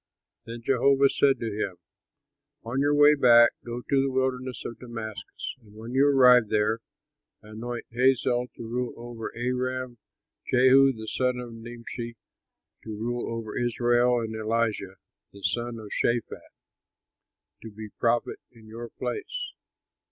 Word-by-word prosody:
Then 115 Hz, 0 st, -7 dB
Jehovah 135 Hz, +2 st, +4 dB
said 135 Hz, 0 st, +3 dB
to 115 Hz, -2 st, -2 dB
him, 100 Hz, -3 st, -2 dB, 0.9 s
"On 120 Hz, +4 st, -3 dB
your 145 Hz, +1 st, +3 dB
way 145 Hz, +1 st, +7 dB
back 120 Hz, -4 st, +6 dB
go 120 Hz, +1 st, -5 dB
to 140 Hz, -1 st, +3 dB
the 135 Hz, -, 0 dB
wilderness 130 Hz, -1 st, -2 dB
of 115 Hz, -, -6 dB
Damascus, 115 Hz, -4 st, -7 dB
and 105 Hz, -2 st, -19 dB
when 115 Hz, +3 st, -8 dB
you 135 Hz, +2 st, +4 dB
arrive 125 Hz, -4 st, +6 dB
there, 110 Hz, +1 st, +1 dB, 0.6 s
anoint 115 Hz, +3 st, -6 dB
Hazael 125 Hz, 0 st, +2 dB
to 115 Hz, -, -8 dB
rule 125 Hz, +1 st, -3 dB
over 120 Hz, -1 st, -7 dB
Aram, 125 Hz, 0 st, -2 dB, 0.5 s
Jehu, 130 Hz, +2 st, +6 dB
the 110 Hz, -3 st, -8 dB
son 125 Hz, +2 st, 0 dB
of 120 Hz, -1 st, -7 dB
Nimshi, 115 Hz, 0 st, -7 dB, 0.7 s
to -, -, -10 dB
rule 120 Hz, +2 st, -3 dB
over 115 Hz, -2 st, -5 dB
Israel, 120 Hz, 0 st, +2 dB
and 110 Hz, -1 st, -4 dB
Elisha, 110 Hz, -3 st, -1 dB, 0.4 s
the 100 Hz, 0 st, -14 dB
son 120 Hz, +6 st, -1 dB
of 110 Hz, -2 st, -10 dB
Shaphat, 120 Hz, -1 st, -1 dB, 1.1 s
to 115 Hz, -, -8 dB
be 110 Hz, 0 st, -9 dB
prophet 120 Hz, 0 st, +1 dB
in 115 Hz, -2 st, -18 dB
your 115 Hz, +2 st, -8 dB
place. 485 Hz, -, -5 dB
120 Hz, 140 wpm, -27 LUFS, 115-130 Hz, 1.1 s, way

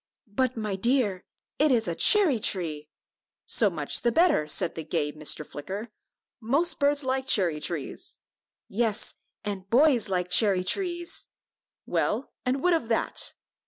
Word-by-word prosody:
"But, 255 Hz, +2 st, 0 dB
my 210 Hz, -3 st, -2 dB
dear, 210 Hz, -3 st, 0 dB, 0.3 s
it 300 Hz, 0 st, +4 dB
is 230 Hz, -3 st, +2 dB
a 170 Hz, -, -1 dB
cherry 330 Hz, -, +4 dB
tree." 155 Hz, -7 st, -1 dB, 0.6 s
"So 215 Hz, -, +4 dB
much 155 Hz, -5 st, +1 dB
the 240 Hz, -, +2 dB
better," 320 Hz, -, +3 dB
said 160 Hz, -, +1 dB
the 160 Hz, -, -6 dB
gay 155 Hz, -1 st, -2 dB
Mr. 150 Hz, 0 st, -2 dB
Flicker; 195 Hz, +12 st, -7 dB, 0.5 s
"most 290 Hz, +9 st, +1 dB
birds 285 Hz, 0 st, +2 dB
like 265 Hz, 0 st, -2 dB
cherry 170 Hz, -7 st, +2 dB
trees." 155 Hz, -2 st, -4 dB, 0.5 s
"Yes, 220 Hz, 0 st, -1 dB, 0.3 s
and 195 Hz, -2 st, -5 dB
boys 255 Hz, -2 st, +4 dB
like 180 Hz, -1 st, -1 dB
cherry 195 Hz, -4 st, +4 dB
trees!" 345 Hz, -, -1 dB, 0.6 s
"Well, -, -, -1 dB, 0.2 s
and 265 Hz, +2 st, 0 dB
what 360 Hz, 0 st, +4 dB
of 320 Hz, -9 st, 0 dB
that?" 225 Hz, -1 st, -1 dB
220 Hz, 145 wpm, -26 LUFS, 180-265 Hz, 0.6 s, it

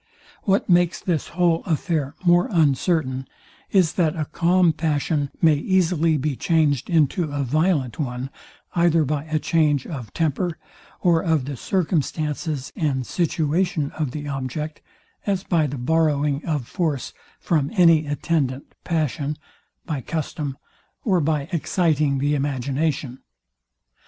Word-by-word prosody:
What 195 Hz, 0 st, +2 dB
makes 175 Hz, -1 st, +3 dB
this 170 Hz, -5 st, -1 dB
whole 170 Hz, -2 st, +1 dB
affair 155 Hz, -4 st, -1 dB
more 175 Hz, 0 st, +5 dB
uncertain, 140 Hz, -4 st, +1 dB, 0.4 s
is, 180 Hz, -6 st, +3 dB
that 165 Hz, -4 st, +1 dB
a 155 Hz, -2 st, -2 dB
calm 175 Hz, +2 st, +3 dB
passion 150 Hz, -2 st, 0 dB
may 160 Hz, -2 st, +7 dB
easily 165 Hz, 0 st, +2 dB
be 145 Hz, 0 st, -1 dB
changed 145 Hz, -4 st, +1 dB
into 160 Hz, -1 st, +2 dB
a 145 Hz, -1 st, -1 dB
violent 145 Hz, -, +1 dB
one, 130 Hz, -1 st, -3 dB, 0.4 s
either 170 Hz, -2 st, +3 dB
by 145 Hz, +1 st, -2 dB
a 155 Hz, -1 st, -1 dB
change 150 Hz, -3 st, +1 dB
of 125 Hz, -, -7 dB
temper, 165 Hz, +2 st, -1 dB, 0.4 s
or 170 Hz, -2 st, +3 dB
of 160 Hz, -6 st, +1 dB
the 140 Hz, 0 st, -4 dB
circumstances 155 Hz, -2 st, -2 dB
and 135 Hz, -6 st, -1 dB
situation 160 Hz, -1 st, 0 dB
of 155 Hz, -3 st, -2 dB
the 145 Hz, +3 st, -6 dB
object, 140 Hz, +3 st, -4 dB, 0.5 s
as 195 Hz, -2 st, 0 dB
by 165 Hz, -6 st, +1 dB
the 140 Hz, 0 st, -5 dB
borrowing 150 Hz, +1 st, +1 dB
of 150 Hz, -7 st, -2 dB
force 155 Hz, -8 st, -2 dB, 0.3 s
from 150 Hz, -5 st, 0 dB
any 165 Hz, -5 st, +5 dB
attendant 145 Hz, -3 st, -1 dB
passion, 150 Hz, -3 st, -1 dB, 0.5 s
by 150 Hz, -6 st, -3 dB
custom, 145 Hz, -1 st, -4 dB, 0.5 s
or 185 Hz, -6 st, +3 dB
by 150 Hz, -2 st, 0 dB
exciting 155 Hz, -4 st, +1 dB
the 145 Hz, +2 st, +1 dB
imagination. 140 Hz, -1 st, -1 dB
155 Hz, 130 wpm, -23 LUFS, 140-170 Hz, 0.5 s, may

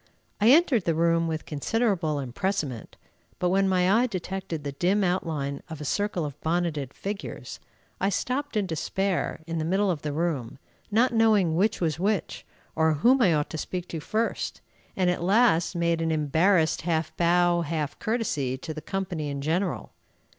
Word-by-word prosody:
I 215 Hz, +2 st, +5 dB
entered 270 Hz, -, +5 dB
the 165 Hz, -, +1 dB
room 165 Hz, 0 st, +2 dB
with 160 Hz, -1 st, -3 dB
considerable 170 Hz, -, 0 dB
empressement, 140 Hz, -, -3 dB, 0.4 s
but 180 Hz, -, +1 dB
when 195 Hz, +1 st, +2 dB
my 185 Hz, +4 st, +3 dB
eye 250 Hz, -, +2 dB
detected 185 Hz, -, -4 dB
the 140 Hz, -, -3 dB
dim 185 Hz, +8 st, +1 dB
outline 155 Hz, -6 st, -1 dB
of 160 Hz, -2 st, -7 dB
a 150 Hz, -, -6 dB
circle 200 Hz, 0 st, -1 dB
of 145 Hz, -1 st, -8 dB
bonneted 160 Hz, -5 st, -1 dB
figures, 200 Hz, +6 st, -6 dB, 0.4 s
I 195 Hz, -, +2 dB
stopped 255 Hz, +6 st, -2 dB
in 205 Hz, -, +1 dB
despair 185 Hz, +3 st, -2 dB
in 165 Hz, 0 st, -3 dB
the -, -, -1 dB
middle 190 Hz, +4 st, +1 dB
of 155 Hz, -5 st, -3 dB
the 150 Hz, -, -3 dB
room, 145 Hz, -7 st, -2 dB, 0.3 s
not 235 Hz, +4 st, +3 dB
knowing 215 Hz, -7 st, +3 dB
which 200 Hz, +6 st, +1 dB
was 160 Hz, -2 st, 0 dB
which, 200 Hz, 0 st, -1 dB, 0.3 s
or 160 Hz, 0 st, +3 dB
whom 245 Hz, -, +4 dB
I 175 Hz, -8 st, +4 dB
ought 150 Hz, -1 st, -1 dB
to 160 Hz, -, -4 dB
speak 180 Hz, +2 st, -4 dB
to 165 Hz, -, -4 dB
first, 220 Hz, +8 st, -2 dB, 0.4 s
and 185 Hz, -1 st, +2 dB
at 180 Hz, -, -3 dB
last 190 Hz, -2 st, +3 dB
made 170 Hz, -1 st, +1 dB
an 165 Hz, -, 0 dB
embarrassed 160 Hz, +3 st, +2 dB
half 160 Hz, -2 st, -1 dB
bow, 175 Hz, 0 st, +3 dB
half 155 Hz, -2 st, -3 dB
courtesy, 175 Hz, -, -1 dB
to 155 Hz, +4 st, -6 dB
the 155 Hz, -, -7 dB
company 175 Hz, -6 st, -3 dB
in 140 Hz, 0 st, -4 dB
general. 170 Hz, +6 st, -1 dB
175 Hz, 175 wpm, -26 LUFS, 155-195 Hz, 0.4 s, I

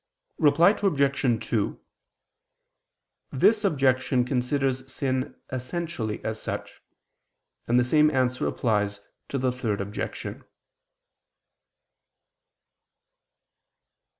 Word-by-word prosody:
Reply 160 Hz, +5 st, +6 dB
Obj. 140 Hz, -, +1 dB
2: 110 Hz, -4 st, -1 dB, 1.5 s
This 210 Hz, -, +3 dB
objection 130 Hz, -7 st, +2 dB
considers 130 Hz, +1 st, -1 dB
sin 130 Hz, -1 st, -2 dB, 0.2 s
essentially 130 Hz, -3 st, -4 dB
as 110 Hz, 0 st, -3 dB
such: -, -, -6 dB, 0.9 s
and 120 Hz, -, +3 dB
the 125 Hz, -, +5 dB
same 150 Hz, +4 st, +4 dB
answer 130 Hz, -3 st, 0 dB
applies 105 Hz, -3 st, 0 dB, 0.3 s
to 140 Hz, -, -2 dB
the 130 Hz, -1 st, +1 dB
Third 115 Hz, -5 st, -2 dB
Objection. 100 Hz, +1 st, -5 dB
130 Hz, 80 wpm, -26 LUFS, 120-140 Hz, 1.5 s, Reply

